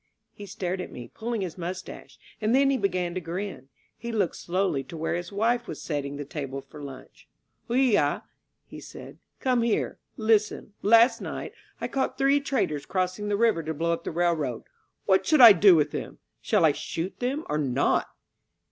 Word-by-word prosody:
He 205 Hz, -, -10 dB
stared 185 Hz, 0 st, -3 dB
at -, -, -7 dB
me, 120 Hz, -, -9 dB
pulling 230 Hz, -1 st, -3 dB
his 180 Hz, -1 st, -5 dB
mustache. 180 Hz, +2 st, -7 dB, 0.2 s
And 220 Hz, +3 st, +2 dB
then 275 Hz, 0 st, +4 dB
he 270 Hz, -, +1 dB
began 180 Hz, -3 st, -1 dB
to 185 Hz, -, -3 dB
grin. 175 Hz, -3 st, -6 dB, 0.3 s
He 235 Hz, -, -6 dB
looked 210 Hz, -6 st, 0 dB
slowly 175 Hz, -6 st, -1 dB
to 165 Hz, -, -9 dB
where 160 Hz, +1 st, -2 dB
his 175 Hz, +2 st, -4 dB
wife 235 Hz, +4 st, 0 dB
was -, -, -6 dB
setting 145 Hz, -2 st, -4 dB
the 145 Hz, -, -5 dB
table 140 Hz, -3 st, -5 dB
for 145 Hz, +2 st, -12 dB
lunch. 135 Hz, -2 st, -11 dB, 0.4 s
Oigay*^ 250 Hz, -2 st, +2 dB, 0.4 s
he -, -, -11 dB
said, -, -, -11 dB, 0.2 s
^^come 250 Hz, -3 st, +2 dB
here. 230 Hz, -2 st, -1 dB, 0.2 s
Listen. 215 Hz, -2 st, +1 dB
Last 230 Hz, +4 st, +5 dB
night -, -, -6 dB, 0.3 s
I -, -, -2 dB
caught 265 Hz, -1 st, -2 dB
three 275 Hz, +1 st, +3 dB
traitors 230 Hz, -, -2 dB
crossing 185 Hz, +2 st, -1 dB
the 205 Hz, -1 st, 0 dB
river 225 Hz, -6 st, +3 dB
to 160 Hz, 0 st, -4 dB
blow 170 Hz, +3 st, 0 dB
up 170 Hz, 0 st, -4 dB
the -, -, -3 dB
railroad. 160 Hz, -8 st, 0 dB, 0.4 s
What 190 Hz, -1 st, +3 dB
shall 305 Hz, -5 st, +6 dB
I 225 Hz, -3 st, +12 dB
do 195 Hz, 0 st, +6 dB
with 150 Hz, -2 st, +2 dB
them? -, -, -6 dB, 0.2 s
Shall -, -, +3 dB
I -, -, +5 dB
shoot 170 Hz, +4 st, -5 dB
them 265 Hz, +5 st, -2 dB
or 150 Hz, -, -1 dB
not?" 135 Hz, -2 st, +1 dB
185 Hz, 185 wpm, -26 LUFS, 165-230 Hz, 0.4 s, I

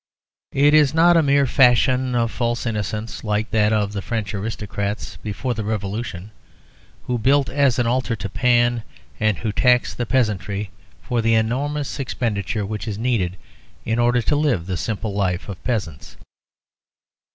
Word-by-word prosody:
It 145 Hz, +2 st, +5 dB
is 150 Hz, -1 st, +5 dB
not 170 Hz, +1 st, +6 dB
a 165 Hz, -, +6 dB
mere 140 Hz, -1 st, +3 dB
fashion 125 Hz, 0 st, +3 dB
of 115 Hz, -1 st, +1 dB
false 120 Hz, 0 st, -2 dB
innocence, 105 Hz, 0 st, -3 dB
like 105 Hz, 0 st, -1 dB
that 105 Hz, -1 st, +3 dB
of 105 Hz, -2 st, 0 dB
the 100 Hz, -, -3 dB
French 110 Hz, -1 st, -3 dB
aristocrats 105 Hz, 0 st, -4 dB
before 110 Hz, +4 st, -3 dB
the 110 Hz, -2 st, -4 dB
Revolution, 105 Hz, -2 st, -4 dB, 0.7 s
who 125 Hz, -1 st, -1 dB
built 135 Hz, +4 st, +3 dB
an 135 Hz, -4 st, +2 dB
altar 125 Hz, 0 st, 0 dB
to 100 Hz, -, -5 dB
Pan, 120 Hz, +2 st, +2 dB, 0.4 s
and 110 Hz, -3 st, +1 dB
who 105 Hz, +5 st, -2 dB
taxed 125 Hz, +3 st, +2 dB
the 120 Hz, -, -1 dB
peasantry 105 Hz, -5 st, -1 dB, 0.3 s
for 120 Hz, -2 st, -1 dB
the 115 Hz, 0 st, +3 dB
enormous 140 Hz, +7 st, -1 dB
expenditure 110 Hz, -5 st, -2 dB
which 105 Hz, 0 st, -5 dB
is 105 Hz, -2 st, -3 dB
needed 105 Hz, -7 st, -1 dB, 0.5 s
in 115 Hz, +1 st, 0 dB
order 120 Hz, 0 st, +3 dB
to 145 Hz, -, +1 dB
live 140 Hz, -, +1 dB
the 95 Hz, 0 st, -3 dB
simple 105 Hz, +3 st, -3 dB
life 95 Hz, -3 st, -1 dB
of 95 Hz, -3 st, -8 dB
peasants. 95 Hz, -, -4 dB
115 Hz, 155 wpm, -21 LUFS, 105-125 Hz, 0.7 s, not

